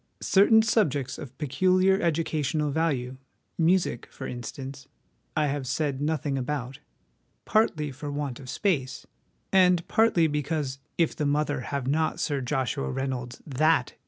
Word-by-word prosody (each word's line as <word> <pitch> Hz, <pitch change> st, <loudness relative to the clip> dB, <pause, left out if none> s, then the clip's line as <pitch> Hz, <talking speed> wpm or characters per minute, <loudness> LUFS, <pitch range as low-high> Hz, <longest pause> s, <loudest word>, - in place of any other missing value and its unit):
Certain 220 Hz, +3 st, +5 dB
subjects 145 Hz, -, +1 dB
of 130 Hz, -3 st, -9 dB
peculiar 185 Hz, +7 st, +2 dB
educational 155 Hz, -2 st, 0 dB
value, 135 Hz, -5 st, -1 dB, 0.4 s
music, 170 Hz, -7 st, +1 dB
for -, -, -8 dB
instance, 135 Hz, +3 st, -7 dB, 0.5 s
I 150 Hz, -, +3 dB
have 140 Hz, -2 st, -2 dB
said 140 Hz, 0 st, -1 dB
nothing 145 Hz, -2 st, -1 dB
about, 130 Hz, 0 st, -4 dB, 0.7 s
partly 155 Hz, -10 st, +1 dB
for 145 Hz, +2 st, -6 dB
want 145 Hz, -4 st, -4 dB
of 130 Hz, -2 st, -10 dB
space, 135 Hz, -9 st, -1 dB, 0.5 s
and 180 Hz, -2 st, +4 dB
partly 220 Hz, -7 st, +3 dB
because 150 Hz, -2 st, -2 dB, 0.2 s
if 165 Hz, -2 st, +2 dB
the 150 Hz, -, -1 dB
mother 145 Hz, -1 st, 0 dB
have 135 Hz, +2 st, -3 dB
not 155 Hz, +4 st, 0 dB
Sir 145 Hz, -3 st, -1 dB
Joshua 135 Hz, +1 st, -1 dB
Reynolds's 130 Hz, -2 st, -4 dB
'that!' 155 Hz, -1 st, +2 dB
145 Hz, 130 wpm, -27 LUFS, 130-160 Hz, 0.7 s, Certain